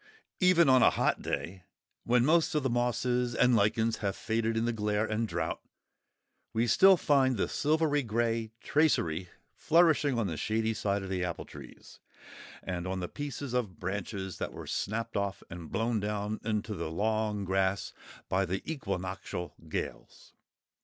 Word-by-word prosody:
Even 180 Hz, -4 st, +5 dB
on 130 Hz, -1 st, +6 dB
a -, -, +7 dB
hot -, -, 0 dB
day, 95 Hz, +2 st, -4 dB, 0.4 s
when 120 Hz, +1 st, +3 dB
most 160 Hz, +1 st, +3 dB
of 150 Hz, -, +1 dB
the 135 Hz, -, 0 dB
mosses 120 Hz, 0 st, 0 dB
and 125 Hz, -1 st, +4 dB
lichens 110 Hz, +2 st, +2 dB
have 100 Hz, -2 st, -2 dB
faded 115 Hz, 0 st, -1 dB
in 115 Hz, -, +1 dB
the 120 Hz, -, 0 dB
glare 105 Hz, -1 st, 0 dB
and 110 Hz, +1 st, -1 dB
drought, -, -, -3 dB, 0.9 s
we 115 Hz, +1 st, +2 dB
still 190 Hz, -, +6 dB
find 135 Hz, -5 st, +3 dB
the -, -, +1 dB
silvery 150 Hz, -1 st, +1 dB
grey 115 Hz, -1 st, -1 dB
tracery 90 Hz, -, +1 dB, 0.2 s
flourishing 160 Hz, -5 st, +3 dB
on 115 Hz, -, +1 dB
the 85 Hz, -5 st, -3 dB
shady 110 Hz, +5 st, 0 dB
side 100 Hz, -2 st, -1 dB
of 95 Hz, -, -6 dB
the 90 Hz, -1 st, -1 dB
apple 85 Hz, -2 st, -4 dB
trees, -, -, -13 dB, 0.6 s
and 90 Hz, -1 st, -4 dB
on 95 Hz, 0 st, -2 dB
the 90 Hz, -, -3 dB
pieces 140 Hz, -1 st, -5 dB
of 115 Hz, -7 st, -2 dB
branches 95 Hz, 0 st, -4 dB
that -, -, -4 dB
were -, -, -8 dB
snapped 115 Hz, +3 st, -3 dB
off 100 Hz, -1 st, -2 dB
and 85 Hz, -2 st, -8 dB
blown 115 Hz, 0 st, 0 dB
down 105 Hz, +1 st, -2 dB
into 110 Hz, -1 st, -2 dB
the 95 Hz, -, -4 dB
long 105 Hz, +3 st, -1 dB
grass 95 Hz, +1 st, 0 dB, 0.3 s
by 95 Hz, +1 st, +1 dB
the 95 Hz, +1 st, -3 dB
equinoctial 95 Hz, -, -4 dB, 0.2 s
gales. -, -, -6 dB
110 Hz, 160 wpm, -30 LUFS, 95-125 Hz, 0.9 s, a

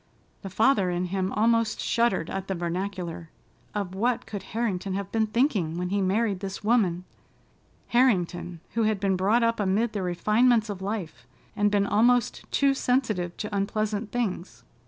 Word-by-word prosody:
The 195 Hz, -, -6 dB
father 210 Hz, -1 st, +3 dB
in 175 Hz, +1 st, -1 dB
him 190 Hz, +1 st, -2 dB
almost 230 Hz, 0 st, +2 dB
shuddered 230 Hz, -8 st, +1 dB
at 195 Hz, 0 st, -4 dB
the 190 Hz, -, -2 dB
vernacular. 175 Hz, -1 st, -4 dB, 0.5 s
Of 200 Hz, -3 st, -3 dB
what 235 Hz, +5 st, 0 dB
could 205 Hz, -2 st, -6 dB
Harrington 200 Hz, -5 st, -2 dB
have 200 Hz, 0 st, -4 dB
been 220 Hz, -1 st, +1 dB
thinking 210 Hz, -, 0 dB
when 180 Hz, 0 st, -2 dB
he 200 Hz, +1 st, 0 dB
married 200 Hz, +1 st, +1 dB
this 195 Hz, 0 st, -6 dB
woman—Harrington, 185 Hz, -2 st, -1 dB
who 230 Hz, -, 0 dB
had 215 Hz, -2 st, +1 dB
been 195 Hz, -1 st, +1 dB
brought 205 Hz, +6 st, +2 dB
up 230 Hz, 0 st, +1 dB
amid 210 Hz, +3 st, +1 dB
the 205 Hz, -, -2 dB
refinements 215 Hz, +5 st, +2 dB
of 195 Hz, -2 st, -7 dB
life, 195 Hz, -5 st, -5 dB, 0.3 s
and 205 Hz, -1 st, +2 dB
been 205 Hz, -1 st, +2 dB
almost 235 Hz, +4 st, +2 dB
too 275 Hz, -1 st, +3 dB
sensitive 225 Hz, -10 st, 0 dB
to 210 Hz, -1 st, -4 dB
unpleasant 210 Hz, +1 st, -1 dB
things? 185 Hz, -, -3 dB
205 Hz, 155 wpm, -26 LUFS, 185-230 Hz, 0.5 s, father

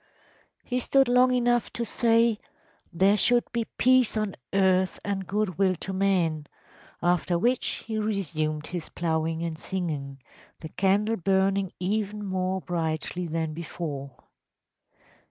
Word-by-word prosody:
‚ÄĚ -, -, -34 dB
“He 250 Hz, 0 st, -1 dB
stood 270 Hz, +1 st, +3 dB
long 250 Hz, +1 st, +4 dB
enough 240 Hz, -1 st, +1 dB
to 235 Hz, -, -2 dB
say: 230 Hz, -1 st, +3 dB, 0.6 s
‚ÄėThere 195 Hz, +4 st, +4 dB
should 240 Hz, +4 st, +4 dB
be 235 Hz, -1 st, -1 dB
peace 255 Hz, -2 st, +3 dB
on 215 Hz, -3 st, -1 dB, 0.2 s
earth 190 Hz, -1 st, +2 dB
and 195 Hz, -2 st, -2 dB
good 200 Hz, -3 st, -1 dB
will 190 Hz, -2 st, +3 dB
to 190 Hz, +3 st, -6 dB
men,’ 175 Hz, -6 st, +1 dB, 0.6 s
after 175 Hz, 0 st, +2 dB
which 240 Hz, +7 st, 0 dB
he 220 Hz, -1 st, -2 dB
resumed 155 Hz, -8 st, -2 dB
his 175 Hz, -3 st, -6 dB
ploughing 160 Hz, -1 st, -1 dB
and 165 Hz, -2 st, -4 dB
singing, 150 Hz, -9 st, -4 dB, 0.4 s
the 160 Hz, -, -7 dB
candle 205 Hz, +6 st, +1 dB
burning 190 Hz, +1 st, +1 dB
even 210 Hz, +2 st, -2 dB
more 185 Hz, 0 st, -1 dB
brightly 170 Hz, +1 st, -3 dB
than 160 Hz, -1 st, -2 dB
before. 150 Hz, -4 st, -6 dB
190 Hz, 135 wpm, -26 LUFS, 165-215 Hz, 0.6 s, long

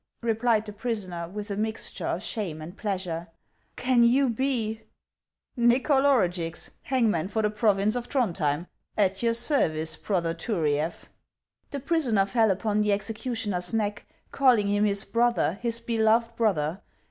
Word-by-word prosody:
" -, -, -42 dB
replied 225 Hz, -1 st, +1 dB
the 210 Hz, -, -7 dB
prisoner, 195 Hz, -7 st, -4 dB
with 205 Hz, +2 st, -6 dB
a -, -, -2 dB
mixture 220 Hz, +2 st, -2 dB
of -, -, -2 dB
shame 185 Hz, -8 st, -3 dB
and 160 Hz, +4 st, -9 dB
pleasure; 185 Hz, -5 st, -3 dB, 0.2 s
" -, -, -43 dB
can 250 Hz, -2 st, +4 dB
you 250 Hz, +2 st, +4 dB
be 225 Hz, -3 st, -1 dB, 0.2 s
— -, -, -64 dB
" -, -, -65 dB
" -, -, -49 dB
Xychol 265 Hz, +4 st, +3 dB
Orugix, 180 Hz, -11 st, +1 dB
hangman 225 Hz, -11 st, +1 dB
for 220 Hz, +2 st, -1 dB
the 210 Hz, -, +1 dB
province 210 Hz, 0 st, +2 dB
of 245 Hz, -1 st, -4 dB
Thrond 240 Hz, -11 st, 0 dB
hjem, 150 Hz, 0 st, 0 dB, 0.3 s
at 195 Hz, -2 st, +1 dB
your 230 Hz, -1 st, +2 dB
service, 165 Hz, -, +1 dB
brother 170 Hz, -5 st, -1 dB
Turiaf." 165 Hz, -4 st, -1 dB, 0.6 s
The 280 Hz, -, -5 dB
prisoner 260 Hz, -10 st, +2 dB
fell 220 Hz, +1 st, +2 dB
upon 210 Hz, +2 st, 0 dB
the 210 Hz, 0 st, +2 dB
executioner's 210 Hz, -3 st, -2 dB
neck, 205 Hz, -2 st, -2 dB, 0.2 s
calling 245 Hz, -7 st, +4 dB
him 205 Hz, +1 st, +2 dB
his 200 Hz, -1 st, +2 dB
brother, 230 Hz, -4 st, +1 dB
his 235 Hz, -1 st, 0 dB
beloved 230 Hz, 0 st, +1 dB
brother. 190 Hz, -6 st, 0 dB
215 Hz, 160 wpm, -26 LUFS, 185-235 Hz, 0.6 s, can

